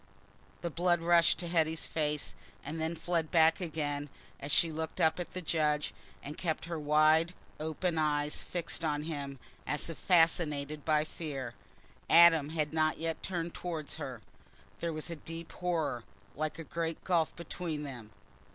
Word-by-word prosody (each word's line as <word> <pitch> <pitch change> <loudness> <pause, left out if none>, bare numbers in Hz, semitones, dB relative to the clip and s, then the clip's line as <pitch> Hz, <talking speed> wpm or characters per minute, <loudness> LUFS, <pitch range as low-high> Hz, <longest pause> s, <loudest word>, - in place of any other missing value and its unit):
The 170 - -2
blood 175 +1 +2
rushed 170 0 +5
to 175 - -5
Hetty's 160 -1 +1
face, 150 -2 -1 0.3
and 160 +3 -4
then 160 +1 -1
fled 165 -1 -1
back 160 +1 +5
again 150 -4 -2 0.3
as 140 - -4
she 165 +2 +4
looked 160 +1 -4
up 160 +2 +3
at 175 - -5
the 185 - -3
judge 150 -2 +1 0.3
and 145 +2 -7
kept 165 -3 -1
her 170 -1 -3
wide 155 +3 +4 0.2
open 160 +2 -1
eyes 150 -1 +1
fixed 170 -1 -3
on 150 -2 0
him, 140 -3 -4 0.3
as 150 +3 -1
if 165 - -10
fascinated 155 -4 +2
by 155 -1 +3
fear. 140 -7 -5 0.6
Adam 165 -4 +7
had 155 -1 -1
not 155 -1 +2
yet 165 0 -2
turned 170 -2 -3
towards 160 -5 -4
her, - - -6 0.6
there 170 - -1
was 155 +2 -3
a - - -3
deep 165 +1 -7
horror, 165 -9 -1 0.3
like 155 0 -2
a 165 - -6
great 165 +1 -3
gulf, 170 -4 +2
between 165 -2 -4
them. 125 -6 -7
160 Hz, 160 wpm, -32 LUFS, 150-170 Hz, 0.6 s, Adam